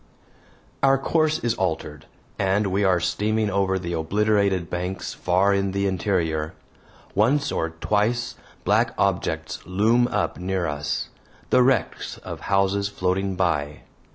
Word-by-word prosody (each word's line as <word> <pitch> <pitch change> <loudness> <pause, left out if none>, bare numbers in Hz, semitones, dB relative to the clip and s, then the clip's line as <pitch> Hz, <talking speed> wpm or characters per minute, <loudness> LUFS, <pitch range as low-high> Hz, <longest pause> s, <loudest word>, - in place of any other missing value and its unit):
Our 135 0 +5
course 155 +3 +1
is 120 -1 +2
altered, 95 -7 -3 0.3
and 100 +1 +2
we 100 +2 +1
are 95 -2 +3
steaming 105 +4 0
over 95 -1 +1
the 85 -2 -4
obliterated 100 +1 +1
banks 90 +2 -4
far 95 +3 +2
in 100 -1 0
the 100 0 0
interior. 85 -5 -1 0.6
Once 140 +8 +2
or 80 - -1
twice 105 +8 0 0.3
black - - +2
objects - - -1
loom 110 +7 +2
up 105 -5 -1
near 90 0 -1
us 75 -2 -2 0.4
the - - +6
wrecks 125 -8 0
of - - -8
houses 100 0 +2
floating 95 -1 -1
by. 75 -5 -1
95 Hz, 130 wpm, -24 LUFS, 90-105 Hz, 0.6 s, the